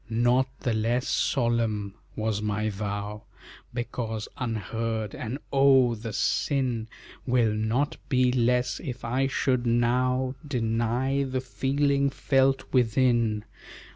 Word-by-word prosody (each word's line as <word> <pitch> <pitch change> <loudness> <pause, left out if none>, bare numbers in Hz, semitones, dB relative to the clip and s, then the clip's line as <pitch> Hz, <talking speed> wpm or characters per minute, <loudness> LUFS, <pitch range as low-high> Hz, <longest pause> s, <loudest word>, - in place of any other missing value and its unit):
Not 120 +3 +3
the 120 -4 0
less 115 +4 0
solemn 115 -6 0 0.2
was 110 -1 -1
my 105 0 -1
vow 105 +1 -4 0.5
Because 120 -3 -4
unheard, 115 -3 -3
and 120 +5 -4 0.2
oh! 135 -3 +5
the 115 0 -6
sin 125 0 0 0.4
Will 120 -3 +3
not 110 +7 0
be 125 -1 +3
less, 125 0 +1
if 125 -2 -6
I 130 +3 +1
should 125 -2 0
now 125 +2 +2
Deny 120 +2 0
the 130 -1 -1
feeling 140 +2 +1
felt 135 0 +2
within. 120 -3 +2
120 Hz, 110 wpm, -27 LUFS, 110-130 Hz, 0.5 s, oh